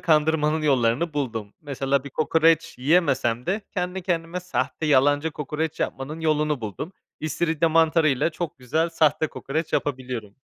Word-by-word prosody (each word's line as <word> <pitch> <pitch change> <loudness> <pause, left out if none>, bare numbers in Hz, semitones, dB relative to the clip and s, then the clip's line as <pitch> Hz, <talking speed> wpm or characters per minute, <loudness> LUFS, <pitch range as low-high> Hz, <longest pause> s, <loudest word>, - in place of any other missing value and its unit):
kandırmanın 155 -1 +2
yollarını 135 +2 +2
buldum. 115 -7 -3
Mesela 140 -2 -1
bir 140 - -8
kokoreç 160 +3 +2
yiyemesem 130 -5 +2
de 195 +5 0
kendi 180 -1 -3
kendime 175 0 -2
sahte, 155 -4 -2
yalancı 145 +2 +3
kokoreç 150 +2 -4
yapmanın 150 +5 -3
yolunu 150 -3 +1
buldum. 110 - -6 0.3
İstiridye 160 +1 0
mantarıyla 160 -3 +3
çok 165 -3 -5
güzel 160 +7 0
sahte 160 -1 +2
kokoreç 155 +2 -4
yapabiliyorum. 125 -7 -3
150 Hz, 130 wpm, -24 LUFS, 135-165 Hz, 0.3 s, yalancı